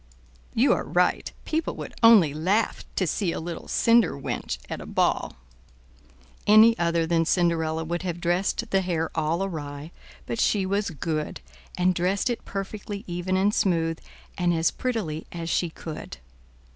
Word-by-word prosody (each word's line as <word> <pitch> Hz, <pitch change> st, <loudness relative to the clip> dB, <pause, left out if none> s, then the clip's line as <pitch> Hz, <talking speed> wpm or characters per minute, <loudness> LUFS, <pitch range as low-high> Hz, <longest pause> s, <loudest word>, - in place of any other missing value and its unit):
"You -, -, +4 dB
are -, -, -1 dB
right; 175 Hz, +7 st, +1 dB
people 320 Hz, +1 st, -1 dB
would -, -, -7 dB
only 215 Hz, -11 st, +7 dB
laugh 190 Hz, +8 st, 0 dB
to 190 Hz, -, +1 dB
see 180 Hz, +2 st, 0 dB
a -, -, -3 dB
little 170 Hz, +1 st, -6 dB
cinder 230 Hz, 0 st, +4 dB
wench 135 Hz, -, -3 dB
at -, -, -5 dB
a -, -, -9 dB
ball." -, -, 0 dB, 1.1 s
Any 215 Hz, +2 st, +7 dB
other 170 Hz, -1 st, +1 dB
than 165 Hz, 0 st, +2 dB
Cinderella 165 Hz, -2 st, +1 dB
would 170 Hz, +2 st, -3 dB
have 175 Hz, -2 st, -4 dB
dressed 175 Hz, +2 st, 0 dB
the 195 Hz, -, +3 dB
hair 170 Hz, -3 st, -1 dB
all 165 Hz, +3 st, 0 dB
awry, 150 Hz, -4 st, -6 dB, 0.3 s
but 230 Hz, -, -4 dB
she 200 Hz, -4 st, +2 dB
was 200 Hz, +2 st, 0 dB
good, 155 Hz, -1 st, -3 dB, 0.4 s
and 180 Hz, +1 st, +3 dB
dressed 185 Hz, +7 st, 0 dB
it 235 Hz, -, -5 dB
perfectly 200 Hz, +1 st, -5 dB
even 175 Hz, +1 st, -2 dB
and 200 Hz, +2 st, +2 dB
smooth, 165 Hz, -6 st, +1 dB, 0.4 s
and 175 Hz, -1 st, +2 dB
as 165 Hz, 0 st, +2 dB
prettily 205 Hz, -12 st, -3 dB
as 170 Hz, -1 st, -4 dB
she 175 Hz, -, +1 dB
could. 160 Hz, -1 st, -8 dB
175 Hz, 160 wpm, -25 LUFS, 165-200 Hz, 1.1 s, only